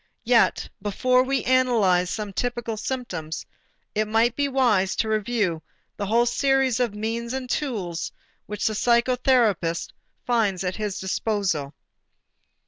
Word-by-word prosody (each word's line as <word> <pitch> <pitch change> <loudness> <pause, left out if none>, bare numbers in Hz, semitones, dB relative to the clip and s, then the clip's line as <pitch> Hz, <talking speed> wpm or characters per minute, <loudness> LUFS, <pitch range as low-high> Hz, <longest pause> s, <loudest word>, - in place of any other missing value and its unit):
Yet 235 -1 +3
before 250 +5 +2
we 265 -1 0
analyze 225 -9 +3
some 210 -1 -4
typical 240 0 -2
symptoms, 200 -10 -4 0.5
it 215 0 0
might 225 +2 +2
be 285 0 +1
wise 235 -9 +2
to 220 - 0
review 215 -6 0 0.3
the 200 - -4
whole 235 +3 +3
series 270 0 +2
of 235 -4 0
means 230 +3 -3
and 265 -1 -4
tools 205 - -3 0.4
which 210 0 -4
the 220 - +2
psychotherapist 235 -7 +2 0.4
finds 215 -6 +1
at 180 0 -2
his 210 -2 -3
disposal. 190 -7 -1
225 Hz, 130 wpm, -24 LUFS, 195-245 Hz, 0.5 s, Yet